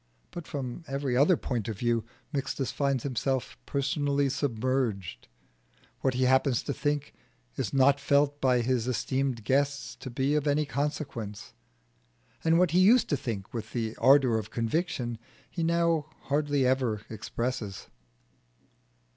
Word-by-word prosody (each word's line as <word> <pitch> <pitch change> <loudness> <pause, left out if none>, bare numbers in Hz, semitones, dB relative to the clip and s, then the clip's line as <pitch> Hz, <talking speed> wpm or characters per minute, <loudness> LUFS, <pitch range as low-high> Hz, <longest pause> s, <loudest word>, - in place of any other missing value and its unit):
But 175 -2 -7
from 135 +2 -5
every 135 -2 -1
other 150 +7 +5
point 120 -6 -3
of 110 -3 -4
view 120 0 +1 0.3
Mixtus 135 -1 -2
finds 140 -3 0
himself 130 -1 -1
personally 140 0 0
submerged: 115 - -1 0.7
what 130 -1 0
he 130 - +1
happens 130 -1 +3
to 140 - -2
think 145 +1 -2 0.4
is - - -2
not 140 +1 +4
felt 145 0 +2
by 125 -2 +3
his 125 -1 0
esteemed 130 -1 -1
guests 140 +2 0
to 130 - -7
be 130 +3 0
of 150 -1 +1
any 150 +1 +2
consequence, 135 -7 -4 0.9
and 165 0 +4
what 180 -2 +3
he 175 - +4
used 225 +7 +5
to 145 - +2
think 110 -7 -5
with 110 -2 -5
the 115 -2 -2
ardour 130 -2 +5
of 110 -1 -7
conviction 120 0 -2 0.3
he 170 - -4
now 165 -2 +2 0.2
hardly 145 -1 +1
ever 125 -5 +1
expresses. 110 -2 -4
135 Hz, 140 wpm, -28 LUFS, 120-145 Hz, 0.9 s, other